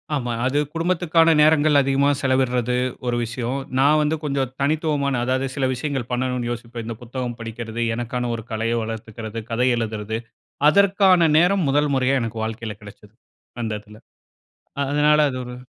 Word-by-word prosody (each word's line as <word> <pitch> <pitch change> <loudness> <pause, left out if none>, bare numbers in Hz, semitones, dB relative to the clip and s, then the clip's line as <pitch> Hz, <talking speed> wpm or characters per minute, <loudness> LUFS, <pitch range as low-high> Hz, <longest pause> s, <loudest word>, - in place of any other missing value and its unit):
ஆமா, 120 -3 -2
அது 130 +3 0 0.2
குடும்பத்துக்கான 165 -1 +2
நேரங்கள் 150 -1 +5
அதிகமா 135 +1 +2
செலவிடுறது 125 -3 +1 0.3
ஒரு 120 - +1
விஷயம். 120 +3 -3 0.2
நான் 150 +3 +5
வந்து 150 +2 +1
கொஞ்சம் 135 -3 -1
தனித்துவமான, 145 -1 0
அதாவது 130 +1 0
சில 135 - 0
விஷயங்கள் 130 -2 -3
பண்ணணும்னு 125 -1 -1
யோசிப்பேன். 115 -1 -6
இந்த 115 -1 -5
புத்தகம் 120 0 -5
படிக்கிறது, 115 0 -5
எனக்கான 120 0 -3
ஒரு 115 - -7
கலைய 115 +2 -1
வளர்த்துக்கிறது, 110 0 -6
கதை 125 +3 +1
எழுதுறது, 110 -1 -3 0.5
அதற்கான 190 -3 +4
நேரம் 180 +2 +3
முதல் 145 +1 +2
முறையா 130 +1 +2
எனக்கு 115 -1 -4
வாழ்க்கையில 110 -1 -5
கிடைச்சது 105 +1 -14 0.5
அந்த 110 -1 -2
இதுல. 105 +1 -16 0.9
அதனால 150 +1 +3
அது 130 - -6
ஒரு 125 0 -8
125 Hz, 145 wpm, -22 LUFS, 115-145 Hz, 0.9 s, நேரங்கள்